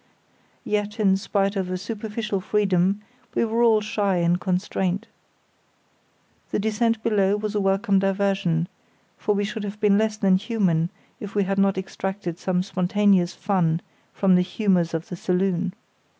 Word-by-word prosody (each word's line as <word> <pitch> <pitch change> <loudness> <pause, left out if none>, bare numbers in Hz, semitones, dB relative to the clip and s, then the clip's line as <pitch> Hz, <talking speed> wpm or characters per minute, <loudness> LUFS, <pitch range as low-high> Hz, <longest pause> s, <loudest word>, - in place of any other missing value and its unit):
Yet, 210 +1 -2
in 195 -3 +4
spite 195 +1 0
of 190 -2 -2
a 185 - -2
superficial 210 0 -4
freedom, 195 0 +1 0.3
we - - +2
were 230 +1 0
all 225 -2 +5
shy 205 -2 0
and 175 +1 +1
constrained. 190 +1 -1 1.4
The - - -1
descent 220 +2 0
below 205 -2 +2
was 210 0 -3
a 210 - 0
welcome 195 0 +2
diversion, 195 -4 +1 0.5
for 210 - +1
we 205 - 0
should 210 +1 -5
have 205 +1 -6
been 205 -1 +4
less 215 -1 0
than 195 -3 +4
human 190 -6 0 0.3
if 205 -1 -8
we 205 - +3
had 195 +1 -1
not 195 -1 +3
extracted 190 -2 -4
some 180 -2 0
spontaneous 185 -1 +2
fun 175 -5 +1 0.3
from 195 -2 +2
the 180 - +5
humours 180 -3 +1
of 165 +1 -4
the 180 - -4
saloon. 185 +1 0
195 Hz, 155 wpm, -24 LUFS, 185-210 Hz, 1.4 s, all